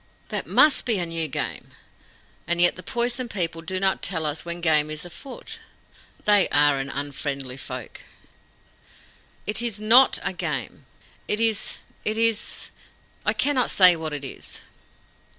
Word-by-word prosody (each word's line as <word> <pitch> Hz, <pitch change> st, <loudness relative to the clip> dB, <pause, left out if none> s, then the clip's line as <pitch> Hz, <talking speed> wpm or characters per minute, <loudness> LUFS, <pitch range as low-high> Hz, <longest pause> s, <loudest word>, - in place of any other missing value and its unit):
'" -, -, -34 dB
"That -, -, -3 dB
MUST 300 Hz, -2 st, +4 dB
be 230 Hz, -, +2 dB
new 165 Hz, -1 st, -2 dB
game. 135 Hz, -, -5 dB, 0.7 s
And 175 Hz, 0 st, 0 dB
yet 175 Hz, 0 st, +6 dB
the 185 Hz, -, -9 dB
Poison 240 Hz, +5 st, -2 dB
People 170 Hz, -5 st, -2 dB
do 185 Hz, +3 st, -3 dB
not 190 Hz, 0 st, +1 dB
tell 165 Hz, -5 st, -2 dB
us 150 Hz, +1 st, -3 dB
when 170 Hz, 0 st, -5 dB
game 155 Hz, -3 st, +2 dB
is 155 Hz, +2 st, -5 dB
afoot. 270 Hz, -, -8 dB, 0.7 s
They 205 Hz, -2 st, +4 dB
are 145 Hz, -1 st, +3 dB
an 135 Hz, 0 st, -4 dB
unfriendly 140 Hz, -2 st, -4 dB
folk." -, -, -8 dB, 1.4 s
"It 210 Hz, +2 st, +3 dB
is 230 Hz, -4 st, -1 dB
NOT 235 Hz, +5 st, +6 dB, 0.2 s
game. -, -, -4 dB, 0.4 s
It 210 Hz, -, +1 dB
is 225 Hz, -2 st, +1 dB, 0.3 s
it 215 Hz, +1 st, -1 dB
is 225 Hz, -1 st, +1 dB, 0.6 s
I 215 Hz, -, +4 dB
cannot 255 Hz, +3 st, +1 dB
say 180 Hz, -2 st, +7 dB
what 160 Hz, -1 st, -5 dB
it 145 Hz, -1 st, -5 dB
is." -, -, -8 dB
180 Hz, 150 wpm, -24 LUFS, 155-225 Hz, 1.4 s, say